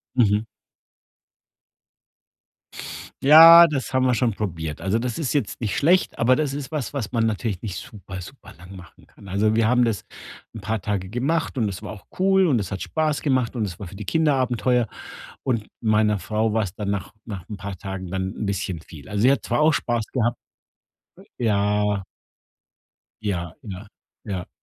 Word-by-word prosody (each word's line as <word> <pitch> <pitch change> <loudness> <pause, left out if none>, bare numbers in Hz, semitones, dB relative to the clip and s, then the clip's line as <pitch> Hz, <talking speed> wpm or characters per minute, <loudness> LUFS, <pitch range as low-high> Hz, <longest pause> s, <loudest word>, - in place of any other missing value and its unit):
Mhm. 105 -3 +3 2.8
Ja, 165 +4 +10
das 140 -6 -3
haben 130 0 +3
wir 125 - +3
schon 120 -1 +1
probiert. 85 -7 -4
Also, 95 +6 0
das 120 -1 -3
ist 155 -6 -1
jetzt 110 -10 -1
nicht 110 -4 -2
schlecht, 175 +5 +2
aber 125 +2 +4
das 145 -2 -1
ist 140 0 -5
was, 150 -5 -3
was 120 -8 -3
man 115 -2 +1
natürlich 110 -3 -2
nicht 100 -5 -4
super 95 -2 -8
superlang 90 -4 -13
machen 90 -3 -15
kann. 100 - -16
Also, 105 +3 +1
wir 115 -1 +3
haben 125 +1 +4
das 115 -4 -2 0.5
'n 110 - -8
paar 110 +1 -2
Tage 95 -2 -2
gemacht 140 - -1
und 115 -4 +1
es 95 -1 -5
war 105 - -7
auch 100 - -13
cool 190 0 +4
und 135 -9 +3
es 95 -2 -4
hat 95 - -3
Spaß 155 -2 -1
gemacht 130 -4 +1
und 115 -3 0
es 90 -4 -7
war 100 - -6
für 90 - -11
die 105 - -7
Kinder 150 - +2
Abenteuer. 125 -1 +1 0.6
Und 115 -5 -1
meiner 105 -1 +2
Frau 105 +5 -1
war's 105 -5 -1
dann 105 -2 -4
nach 100 -1 -3
nach 100 -5 -7
'n 105 - -7
paar 100 -1 -6
Tagen 95 0 -6
dann 95 +1 -3
'n - - -4
bisschen 95 -4 -3
viel. 80 -3 -13
Also, 105 -1 -2
sie 125 +4 +6
hat 140 -5 0
zwar 120 - 0
auch 155 +1 +4
Spaß 120 -5 -1
gehabt 120 -2 0 1.0
Ja. 105 -2 +1 1.2
Ja, 90 -5 -3
ja, 100 +1 -8 0.4
ja. 95 -5 -5
110 Hz, 185 wpm, -23 LUFS, 100-125 Hz, 2.8 s, Ja